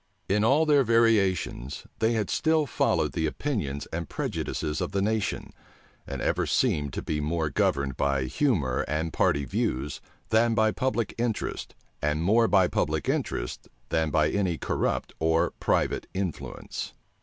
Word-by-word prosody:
In 105 +2 +2
all 140 +8 +4
their 145 -3 +5
variations, 100 - +1
they 115 +1 +2
had 110 -3 -1
still 160 -1 +2
followed 135 - +1
the 80 - 0
opinions 75 - -2
and 85 -2 -3
prejudices 75 -1 -3
of - - -3
the 100 - +1
nation; 110 -1 -1 0.5
and - - -4
ever - - +1
seemed 75 -2 +1
to - - -4
be 75 -1 -2
more 80 0 -1
governed 70 -2 0
by 70 -1 +1
humor 75 - +1
and 80 +2 -2
party 70 -1 +2
views 65 +2 -2 0.3
than 115 +1 +3
by 110 0 +3
public 125 -3 -1
interest, 120 -3 -2 0.3
and 75 +2 0
more 115 +5 +4
by 95 -4 +4
public - - -1
interest - - -2 0.2
than 80 -1 +1
by 75 0 +2
any 95 -5 0
corrupt - - -1
or 80 +1 +2
private - - 0
influence. 95 -4 -4
90 Hz, 150 wpm, -27 LUFS, 75-115 Hz, 0.5 s, their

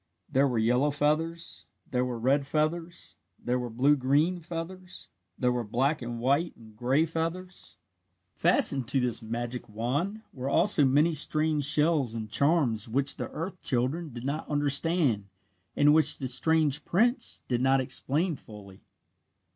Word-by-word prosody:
There 135 +2 +2
were 125 -3 -2
yellow 125 +6 +2
feathers. 155 +3 -2 0.2
There 125 -1 +1
were 125 -2 -3
red 135 +4 +1
feathers. 165 +3 -3 0.2
There 125 +1 -2
were 125 -1 -4
blue 130 +6 +3
green 145 +7 +1
feathers. 175 +2 -8 0.3
There 125 -1 +1
were 125 -1 -2
black 130 +8 -1
and 120 -1 -5
white 140 +8 0
and 110 -2 -17
gray 130 +8 +1
feathers. 165 +3 -5 0.6
Fastened 135 -4 +3
to 135 - +2
this 125 -1 -1
magic 120 +2 -5
wand 145 - -3
were 130 +1 -4
also 165 -1 +3
many 150 +5 +3
strange 155 -1 +1
shells 150 -4 +2
and 110 -2 -6
charms 140 -8 +1
which 135 +4 -1
the - - -5
earth 185 +3 -6
children 135 +6 -2
did 120 +1 -8
not 145 +3 -4
understand 145 - +1 0.5
and 145 +1 +5
which 155 -2 +4
the 130 - -4
strange 150 +2 +2
prince 240 +8 0
did 120 -1 -1
not 135 +1 +3
explain 150 +6 -1
fully. 100 -6 -14
140 Hz, 150 wpm, -28 LUFS, 125-160 Hz, 0.6 s, and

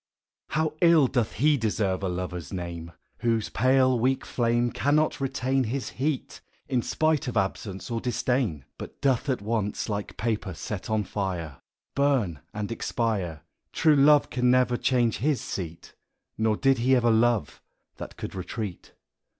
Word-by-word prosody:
HOW 155 0 0
ill 170 -4 +6
doth 120 -4 -1
lie 150 +2 +4
deserve 105 -5 0
a 95 - -1
Lover's 90 -4 -4
name 85 -2 -5 0.3
Whose 115 -2 0
pale 130 0 +3
weak 130 +3 +1
flame 120 0 +1
Cannot 150 +1 +1
retain 135 0 0
His 130 +4 -3
heat, 140 +1 -3 0.3
in 125 -2 +1
spite 155 +2 0
of 120 - -2
absence 95 +2 -2
or 115 -1 -1
disdain; 125 - -1
But - - -9
doth 135 +1 +1
at 125 -6 -1
once, 105 -1 -2
like 105 -1 -4
paper 110 -5 -2
set 105 +5 -5
on 110 -1 +1
fire, 90 -7 -4 0.3
Burn 130 - +1
and 105 +1 -4
expire! 100 -9 -2 0.3
True 155 -2 +4
love 145 +1 +5
can 125 0 +2
never 125 -1 +3
change 120 -2 +1
his 145 +1 +1
seat; 85 -3 -6 0.4
Nor 110 -1 +1
did 135 -2 +3
he 130 +3 +4
ever 120 -2 +3
love 115 -6 +1 0.4
that - - -8
can - - -5
retreat. 95 +1 -6
115 Hz, 150 wpm, -26 LUFS, 100-130 Hz, 0.4 s, ill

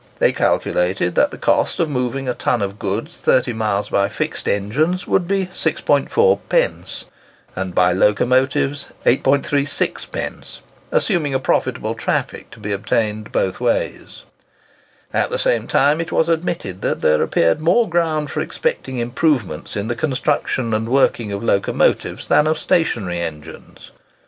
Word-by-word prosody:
They - - +3
calculated 90 0 0
that - - +3
the - - -9
cost - - +1
of 165 - +2
moving 130 -1 -2
a 125 - 0
ton 120 -2 0
of 100 +2 -5
goods 110 - -3
thirty 125 -1 +2
miles 105 -2 -1
by 100 0 +1
fixed - - -4
engines 150 - 0
would 180 -3 +1
be 195 0 +1
6.40d., 475 - 0 0.5
and 95 -1 -4
by 90 0 +4
locomotives, 130 +8 +2 0.2
8.36d.,—assuming 145 - -1
a - - +2
profitable 130 - 0
traffic - - -3
to 120 - -14
be 105 -1 -5
obtained 105 +1 -1
both 95 - -1
ways. - - -2 0.9
At - - +1
the - - -2
same 115 -1 +1
time 145 +4 +3
it 165 - -5
was 160 - +2
admitted 165 - -2
that - - -1
there 75 0 +3
appeared 85 - +2
more 185 +9 +3
ground 160 -4 0
for - - -2
expecting 475 - -3
improvements 120 - -1
in 100 +1 -2
the 120 - -1
construction 130 -2 -1
and 110 +1 -1
working 120 -4 +2
of 100 +1 -4
locomotives 100 -4 +1
than 150 - +4
of 155 0 +1
stationary 115 - 0
engines. 80 -3 -8
125 Hz, 140 wpm, -19 LUFS, 100-155 Hz, 0.9 s, by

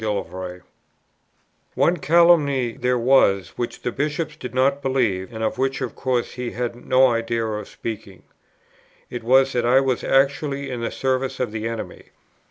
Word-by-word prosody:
One 175 - +3
calumny 150 -5 +4
there 125 0 0
was 115 -7 +3
which 120 - -5
the 125 - -1
Bishop 150 +4 -2
did 125 - -6
not 140 +2 +2
believe, 120 -8 0
and 110 -1 -5
of 110 - -2
which 135 +1 0
of 130 -4 -4
course 125 -3 -1
he 125 -1 -5
had 120 -1 -3
no 130 +2 +3
idea 115 -1 -1
of 105 -1 -4
speaking. 105 -4 -7 0.9
It 120 -2 -5
was 130 +3 +4
that 120 - 0
I 125 +3 +5
was 130 -2 0
actually 140 +1 +1
in 120 -2 -4
the 115 - -1
service 130 0 -2
of 125 -4 -1
the 110 0 -3
enemy. 115 -1 -6
125 Hz, 160 wpm, -22 LUFS, 115-135 Hz, 0.9 s, I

